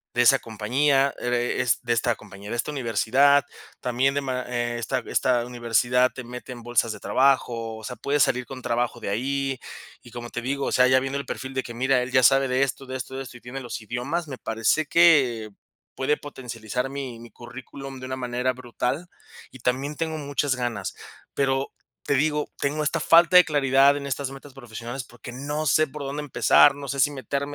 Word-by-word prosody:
de 120 - +4
esa 135 +3 +6
compañía, 135 +6 +1
ere 125 0 -1
es 125 -3 +2
de 120 - -3
esta 120 +1 +1
compañía, 100 0 -11
de - - -2
esta 120 - -2
universidad. 135 +3 +3 0.4
También 130 +2 +1
de 145 - 0
ma 130 -1 -2
eh, 120 -1 -2
esta 120 +2 -1
esta 125 -2 +2
universidad 120 +1 +1
te 125 - -7
mete 125 +2 -9
en 120 -1 -8
bolsas 120 -1 +1
de - - -7
trabajo, 115 -1 +1
o 110 - -12
sea, 125 - -6
puedes 145 +2 0
salir 125 0 +2
con 130 0 -9
trabajo 120 0 -1
de - - -4
ahí, 135 +4 -1 0.4
y 120 - -14
como 120 0 -7
te 120 - -4
digo, 140 +2 -1
o - - -1
sea, 125 - +5
ya 130 0 +5
viendo 135 +1 -3
el 140 - -4
perfil 130 0 -6
de 130 - 0
que 120 - -8
mira, 130 +1 +2
él 125 - -6
ya 130 -1 +5
sabe 135 +3 +5
de 130 +1 +1
esto, 135 0 -1
de 130 - -6
esto, 130 +1 -6
de 135 - -4
esto, 120 -1 -11
y - - -19
tiene 130 +2 -7
los 120 -2 -6
idiomas, 125 +10 -3
me 130 -3 -7
parece 115 +8 0
que 135 -10 +4 0.5
puede 135 +3 +1
potencializar 125 -3 -5
mi 135 -4 -6
mi 120 0 -12
currículum 130 +2 -9
de 130 - -7
una 130 0 -4
manera 125 0 -1
brutal, 130 +6 -3 0.4
y 130 - -13
también 135 +5 -1
tengo 160 0 -2
muchas 140 -1 -1
ganas. 120 -6 -3 0.4
Pero 135 -1 0 0.3
te - - 0
digo, 150 +2 +1
tengo 150 +2 -1
esta 160 +2 0
falta 170 +3 +6
de 180 - +8
claridad 140 -2 +4
en 140 - -6
estas 140 0 -2
metas 135 0 -12
profesionales 120 0 -7
porque 120 0 -11
no 145 +5 -3
sé 155 +2 +3
por 145 +1 -8
dónde 140 +2 -4
empezar, 145 -1 +5
no 140 -1 -8
sé 140 +1 -3
si 145 +3 +4
meterme 140 +2 -4
130 Hz, 210 wpm, -25 LUFS, 120-140 Hz, 0.5 s, de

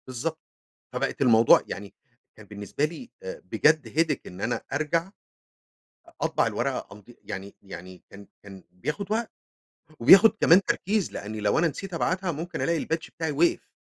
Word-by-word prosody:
بالضبط، 150 +6 -4 0.5
فبقت - - -2
الموضوع 115 -3 +6
يعني 100 0 -7 0.4
كان - - -14
بالنسبة 105 +8 -3
لي 170 +11 -8
آآ - - -7
بجد 155 -1 +2
headache، 160 -4 +2
إن 90 +2 -10
أنا 120 - -1
أرجَع 165 +5 -1 1.1
أطبع - - +1
الورقة - - -2
أمض 100 0 -13 0.2
يعني 95 +1 -7
يعني 95 -2 -11
كان 100 0 -13 0.2
كان 95 -2 -12
بياخد 150 - -4
وقت 225 +1 -1 0.7
وبياخد 195 - +8
كمان 175 +4 +7
تركيز، 200 0 0
لأني 105 +1 -6
لو 105 +6 +2
أنا 170 - +3
نسيت 185 +4 -6
أبعتها 180 +2 -1
ممكن 165 +2 -5
ألاقي 165 -2 0
الpatch 160 0 -3
بتاعي 160 -2 -1
وقف، 165 +4 +1
155 Hz, 150 wpm, -26 LUFS, 105-175 Hz, 1.1 s, وبياخد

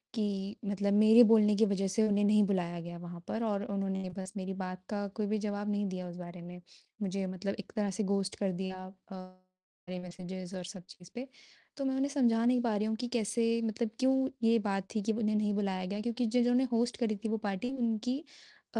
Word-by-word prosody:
कि 200 -2 -2
मतलब 200 0 0
मेरे 215 +3 +8
बोलने 215 -2 +6
की 225 +2 +5
वज़ह 195 -1 +1
से 215 +3 +2
उन्हें 205 0 +2
नहीं 210 0 +5
बुलाया 175 -3 -1
गया 175 0 -7
वहाँ 175 0 -8
पर 230 +1 -2
और 205 -2 0
उन्होंने 190 -1 -2
बस 190 +1 -6
मेरी 190 0 -3
बात 185 0 -5
का 205 -1 -2
कोई 210 -2 -1
भी 215 +1 +1
जवाब 205 0 -2
नहीं 205 0 0
दिया 185 -1 -4
उस 175 - -8
बारे 175 0 -8
में, 180 +1 -9 0.4
मुझे 195 0 -1
मतलब 185 +2 -3
एक 205 - -8
तरह 210 -2 +1
से - - +3
गोस्ट 195 -1 0
कर 195 -2 +1
दिया 190 +1 -4 0.3
अ, 190 - -6 0.7
मेरे 185 0 -4
मैसेज़ 185 +1 -7
और 180 - -4
सब 185 -1 -8
चीज़ 180 0 -14
पे, 255 +3 -5 0.5
तो 275 - -2
मैं 265 0 +1
उन्हें 275 +1 +1
समझा 235 -5 +3
नहीं 245 0 +4
पा 230 -3 +1
रही 215 +1 0
हूँ 220 - 0
कि 245 +2 -3
कैसे 230 0 +1 0.2
मतलब 220 +1 -1
क्यों 265 0 +3 0.2
ये 230 0 +6
बात 195 -1 -1
थी 215 - +1
कि 220 - +1
उन्हें 215 -1 +1
नहीं 210 -1 +2
बुलाया 190 -3 -1
गया 205 +3 -3
क्योंकि 240 +1 -1
जिन्होंने 245 +1 +4
होस्ट 235 +1 +1
करी 225 -3 0
थी 220 - -1
वो 225 - +1
पार्टी 200 +6 -2
उनकी 240 +3 0 0.6
अ, - - +3
205 Hz, 225 wpm, -32 LUFS, 190-225 Hz, 0.7 s, मेरे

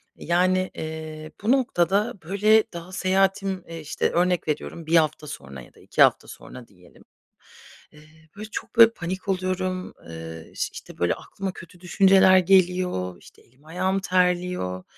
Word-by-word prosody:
Yani, 185 +2 +1
eee, 155 -1 -7
bu 220 - +1
noktada, 220 -4 +1
böyle, 210 +5 +3
daha 170 +1 -8
seyahatim, 190 0 0
eee, 165 0 -8
işte, 155 -1 -2
örnek 180 -1 +1
veriyorum 155 +2 -4
1 165 +2 +1
hafta 155 -1 +2
sonra 70 - -9
ya - - -16
da - - -21
2 - - -2
hafta - - +4
sonra 125 -2 -12
diyelim. 90 -3 -21 0.9
Eee, 155 +1 -20
böyle 215 +1 -8
çok, - - -7
böyle, 230 -1 +9
panik 185 0 -6
oluyorum, 185 -1 -2 0.2
eee, 80 0 -9
iş - - -2
işte, - - -11
böyle 85 - +2
aklıma 195 -1 -6
kötü 175 +1 -13
düşünceler 190 0 +5
geliyor, 180 - +1
işte, - - -18
elim 130 +5 -28
ayağım 185 +4 -1
terliyor. 180 - 0
180 Hz, 150 wpm, -24 LUFS, 155-190 Hz, 0.9 s, böyle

